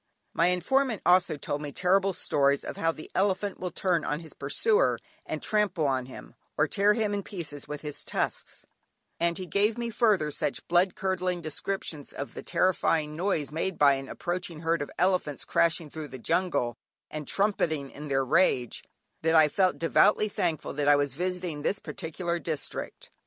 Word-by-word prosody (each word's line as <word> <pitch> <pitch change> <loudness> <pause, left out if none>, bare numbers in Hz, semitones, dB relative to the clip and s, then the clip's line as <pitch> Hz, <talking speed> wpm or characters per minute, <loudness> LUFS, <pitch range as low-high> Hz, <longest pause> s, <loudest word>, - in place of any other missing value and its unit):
My 170 - +3
informant 220 +6 +1
also 175 -3 +4
told 145 0 -3
me 145 -1 -5
terrible 195 +4 +2
stories 140 -5 +1
of - - -5
how 165 - +1
the 155 - -11
elephant 195 +1 0
will 180 - -3
turn 175 -1 0
on 150 - -1
his 160 -3 -12
pursuer 430 - +2 0.3
and - - -4
trample 210 -7 +1
on 130 -2 0
him, 130 - -11 0.2
or 150 - +3
tear 205 +5 +3
him 215 -3 0
in 200 - -1
pieces 155 -8 -7
with 150 0 -5
his 150 -2 -6
tusks, - - -3 0.5
and 170 0 +1
he 185 - -5
gave 205 +6 +1
me 235 -1 -3
further 210 -10 +2
such - - -3
blood 175 +2 +3
curdling 185 -2 -1
descriptions 155 -1 -4
of 140 - -6
the - - -6
terrifying 160 -4 +1
noise 165 -5 -1
made 170 +3 -2
by 140 -1 +6
an 135 -1 -4
approaching 175 -2 -4
herd 165 0 +1
of 145 - -4
elephants 180 -6 +1
crashing 170 -1 +2
through 155 -1 -6
the 130 - -8
jungle, 125 -2 0 0.4
and 155 -1 -5
trumpeting 160 -9 0
in 150 +1 -8
their 135 -1 +1
rage, 130 -5 +2 0.4
that 160 +1 +2
I 155 -1 +7
felt 185 +3 +2
devoutly 210 +5 +4
thankful 170 -6 -2
that 145 0 -1
I 145 - +7
was 145 -2 0
visiting 180 -1 -3
this 195 - 0
particular 170 0 -4
district. 160 -4 -5
170 Hz, 180 wpm, -28 LUFS, 150-190 Hz, 0.5 s, I